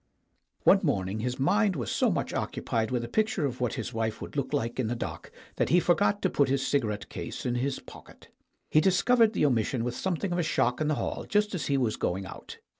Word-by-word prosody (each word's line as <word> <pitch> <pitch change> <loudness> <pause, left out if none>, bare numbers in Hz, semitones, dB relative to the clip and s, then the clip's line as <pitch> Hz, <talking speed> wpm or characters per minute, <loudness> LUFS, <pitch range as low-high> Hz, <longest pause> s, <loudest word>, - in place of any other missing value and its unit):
One - - +6
morning 95 +2 -1
his 125 +2 -2
mind 200 +7 +2
was 120 -8 -3
so - - +2
much - - -2
occupied 110 -1 -2
with 125 -2 -1
a - - -4
picture 215 - 0
of 125 -2 -4
what 125 - 0
his 125 - -5
wife 110 -1 -2
would - - -8
look 140 -2 -2
like 120 -4 -2
in 125 - +1
the 120 - -1
dock 115 - -6 0.3
that - - +1
he 175 - +5
forgot 200 +4 +2
to 190 - +3
put 140 -2 +2
his 135 0 +1
cigarette 110 -7 -1
case - - -6
in 125 - 0
his 130 +3 -1
pocket. - - -14 0.4
He 155 - +5
discovered 220 +6 +4
the - - +2
omission 120 -2 +1
with 120 0 -2
something 185 +4 -2
of 175 - 0
a - - +3
shock 125 -5 +1
in 155 - +1
the 155 - +1
hall - - -4
just 210 0 +2
as 180 - -2
he 140 - +2
was 120 -5 0
going 95 +2 -2
out. 95 - -10
135 Hz, 235 wpm, -28 LUFS, 115-175 Hz, 0.4 s, One